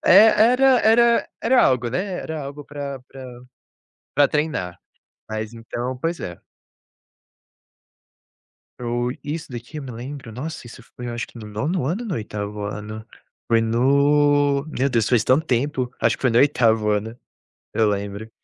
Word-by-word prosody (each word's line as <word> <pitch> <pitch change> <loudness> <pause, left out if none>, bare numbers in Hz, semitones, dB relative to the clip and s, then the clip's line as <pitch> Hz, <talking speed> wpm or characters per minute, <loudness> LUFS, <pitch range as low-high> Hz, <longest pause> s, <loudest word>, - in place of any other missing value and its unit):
É, 205 +4 +8 0.3
era 265 0 +5
era 235 +2 +4
era 250 +2 +4
algo, 125 -2 +2
né, 155 +10 0 0.2
era 160 -1 -5
algo 140 +1 -8
para 140 -2 -6
para 125 -2 -11 0.8
para 145 - +6
treinar. 135 - -2 0.5
Mas, 110 0 -4
então 120 +2 -5
pois 165 +3 -2
é. 85 -1 -6 2.4
O 120 0 -1
isso 150 0 -5
daqui 120 +5 -8
eu 150 - -5
me 130 - -7
lembro, 125 +1 -8
nossa, 130 +5 -6
isso 120 +1 -11
foi 125 - -6
eu 120 - -4
acho 120 - -4
que - - -14
no 110 - -8
9º 130 - -2
ano 180 - -1
ou - - -6
no 195 - -2
8º 105 -2 -5
ano, 105 +1 -6 0.4
foi 115 -1 +3
no 140 +4 +3
meu 140 -3 0
Deus, 115 -4 +1
faz 120 -3 +3
tanto 130 +7 +3
tempo, 130 0 -1
acho - - +2
que - - -22
foi 130 - +3
no 115 - +4
8º 115 -6 +3
ano, 105 +3 -1 0.6
eu 110 - +3
lembro. 100 +2 -4
125 Hz, 165 wpm, -22 LUFS, 115-145 Hz, 2.4 s, É